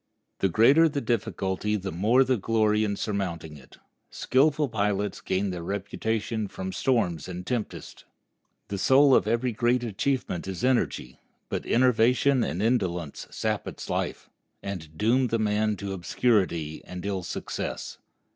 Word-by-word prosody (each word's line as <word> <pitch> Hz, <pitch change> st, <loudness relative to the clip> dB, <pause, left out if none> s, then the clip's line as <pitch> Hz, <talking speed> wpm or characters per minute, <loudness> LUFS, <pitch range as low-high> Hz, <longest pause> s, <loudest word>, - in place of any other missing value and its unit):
The 95 Hz, -, +2 dB
greater 135 Hz, -, +5 dB
the 145 Hz, -1 st, -2 dB
difficulty 105 Hz, -4 st, -1 dB
the 95 Hz, -2 st, -3 dB
more 110 Hz, +10 st, +3 dB
the 130 Hz, 0 st, +1 dB
glory 110 Hz, 0 st, +2 dB
in 100 Hz, -1 st, -1 dB
surmounting 90 Hz, -7 st, -3 dB
it. 65 Hz, -3 st, -16 dB, 0.3 s
Skillful 150 Hz, +2 st, +2 dB
pilots 105 Hz, -3 st, -1 dB
gain 95 Hz, +1 st, -1 dB
their 90 Hz, -1 st, -5 dB
reputation 105 Hz, +4 st, -2 dB
from 95 Hz, -1 st, -6 dB
storms 90 Hz, -, 0 dB
and 90 Hz, 0 st, -6 dB
tempests. 120 Hz, -2 st, -5 dB, 0.6 s
The 100 Hz, -1 st, -3 dB
soul 135 Hz, +5 st, +5 dB
of -, -, +4 dB
every 115 Hz, +3 st, +1 dB
great 120 Hz, +2 st, +1 dB
achievement 115 Hz, -4 st, -2 dB
is 95 Hz, +3 st, -5 dB
energy; 120 Hz, -, 0 dB, 0.3 s
but -, -, -3 dB
enervation 125 Hz, +2 st, +3 dB
and 95 Hz, -2 st, -2 dB
indolence 90 Hz, -, -1 dB
sap -, -, -2 dB
its -, -, -7 dB
life, -, -, -3 dB, 0.4 s
and 80 Hz, -6 st, -6 dB
doom 125 Hz, +8 st, +3 dB
the 115 Hz, -, 0 dB
man 105 Hz, 0 st, +1 dB
to 100 Hz, -1 st, -4 dB
obscurity 90 Hz, -4 st, 0 dB
and 90 Hz, +1 st, -8 dB
ill 100 Hz, -2 st, -2 dB
success. -, -, -5 dB
105 Hz, 145 wpm, -26 LUFS, 95-120 Hz, 0.6 s, greater